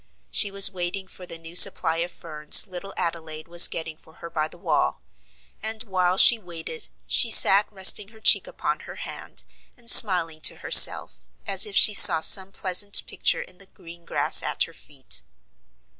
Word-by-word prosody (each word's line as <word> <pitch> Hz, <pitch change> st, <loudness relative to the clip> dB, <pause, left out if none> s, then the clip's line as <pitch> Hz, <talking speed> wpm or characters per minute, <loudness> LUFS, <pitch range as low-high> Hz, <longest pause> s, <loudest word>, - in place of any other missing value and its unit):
She 205 Hz, -, 0 dB
was 195 Hz, 0 st, +3 dB
waiting 185 Hz, +1 st, -7 dB
for 180 Hz, -1 st, -16 dB
the 165 Hz, -, -9 dB
new 165 Hz, +1 st, -14 dB
supply 165 Hz, -2 st, +3 dB
of 170 Hz, +1 st, -6 dB
ferns 150 Hz, -3 st, 0 dB
little 190 Hz, 0 st, -12 dB
Adelaide 160 Hz, -2 st, -8 dB
was 175 Hz, +1 st, +4 dB
getting 160 Hz, -1 st, -9 dB
for 160 Hz, -, -25 dB
her 170 Hz, 0 st, -15 dB
by 155 Hz, -1 st, -6 dB
the 165 Hz, -, -18 dB
wall; -, -, -6 dB, 0.6 s
and 220 Hz, +1 st, -6 dB
while 185 Hz, -4 st, -5 dB
she 235 Hz, +3 st, +3 dB
waited 165 Hz, -4 st, -9 dB, 0.2 s
she 235 Hz, -, 0 dB
sat 205 Hz, -2 st, +5 dB
resting 195 Hz, 0 st, +1 dB
her 220 Hz, +1 st, -20 dB
cheek -, -, +1 dB
upon -, -, -8 dB
her -, -, -15 dB
hand, -, -, -11 dB, 0.3 s
and 235 Hz, -1 st, -1 dB
smiling 170 Hz, -6 st, +4 dB
to -, -, +2 dB
herself, -, -, +3 dB, 0.3 s
as -, -, 0 dB
if 415 Hz, -, -9 dB
she 215 Hz, -, +4 dB
saw 190 Hz, -5 st, +6 dB
some 190 Hz, +4 st, +3 dB
pleasant 195 Hz, +2 st, 0 dB
picture -, -, -5 dB
in 180 Hz, -, -21 dB
the 195 Hz, -, -15 dB
green 170 Hz, -1 st, -19 dB
grass -, -, 0 dB
at -, -, -4 dB
her -, -, -11 dB
feet. 130 Hz, -, -7 dB
180 Hz, 180 wpm, -20 LUFS, 165-200 Hz, 0.6 s, saw